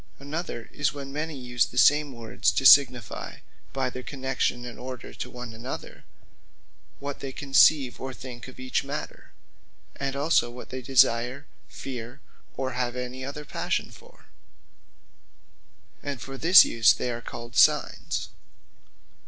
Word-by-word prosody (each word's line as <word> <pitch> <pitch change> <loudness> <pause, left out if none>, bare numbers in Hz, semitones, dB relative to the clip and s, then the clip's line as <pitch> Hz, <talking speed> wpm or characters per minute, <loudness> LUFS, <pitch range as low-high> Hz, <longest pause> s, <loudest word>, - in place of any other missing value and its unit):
Another 145 -4 -5
is, 145 0 0
when 140 -1 -7
many 155 0 -4
use 125 -2 0
the 125 - -11
same 145 +3 +5
words, 115 -3 -1
to 135 - -1
signifie 125 -6 +4 0.3
(by 130 -2 -2
their 130 - -6
connexion 130 -2 -2
and 120 - -9
order,) 125 -1 -8 0.2
one 125 -2 -8
to - - -12
another, 120 +4 -8 0.9
what 140 0 -6
they 135 - -5
conceive, 135 -1 +3
or 130 0 -4
think 125 -1 -9
of 130 - -13
each 130 0 -1
matter; - - -7 0.6
and 140 -1 -3
also 140 -3 +2
what 125 +1 -10
they 130 0 -5
desire, 125 +1 +2 0.2
feare, 120 0 -8 0.4
or 130 -1 -2
have 125 0 -2
any 125 +1 -5
other 145 +3 -6
passion - - -2
for, - - -18 1.8
and 140 -3 -5
for 135 +3 -8
this 170 +7 +8
use 110 -1 +4
they 125 - -3
are 120 0 -5
called 120 +2 -9
Signes. 150 0 +2
130 Hz, 145 wpm, -26 LUFS, 120-140 Hz, 1.8 s, this